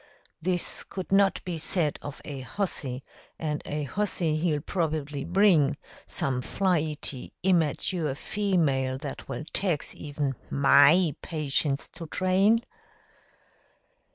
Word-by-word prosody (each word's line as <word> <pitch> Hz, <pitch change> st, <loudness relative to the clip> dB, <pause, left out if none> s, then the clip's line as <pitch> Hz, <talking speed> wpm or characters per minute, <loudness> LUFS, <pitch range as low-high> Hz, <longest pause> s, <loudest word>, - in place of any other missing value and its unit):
This 175 Hz, +1 st, 0 dB
could 190 Hz, -1 st, -7 dB
not 195 Hz, 0 st, +3 dB
be 175 Hz, -3 st, -3 dB
said 155 Hz, -2 st, +1 dB
of 145 Hz, 0 st, -8 dB
a 140 Hz, -2 st, -6 dB
hussy, 130 Hz, -, -3 dB, 0.3 s
and 150 Hz, -2 st, -2 dB
a 150 Hz, 0 st, -2 dB
hussy 170 Hz, +1 st, 0 dB
he'll 155 Hz, -2 st, +1 dB
probably 155 Hz, -5 st, -2 dB
bring 170 Hz, -7 st, +4 dB, 0.3 s
some 130 Hz, -2 st, 0 dB
flighty, 155 Hz, -5 st, -1 dB
immerture 165 Hz, -3 st, +1 dB
female 150 Hz, -12 st, 0 dB
that 140 Hz, -1 st, -7 dB
will 135 Hz, +2 st, -4 dB
tax 175 Hz, -7 st, 0 dB
even 145 Hz, -2 st, -3 dB, 0.2 s
MY 145 Hz, +4 st, +5 dB
patience 145 Hz, -2 st, -1 dB
to 165 Hz, -1 st, -9 dB
train." 190 Hz, +7 st, +3 dB
155 Hz, 110 wpm, -27 LUFS, 140-185 Hz, 0.3 s, MY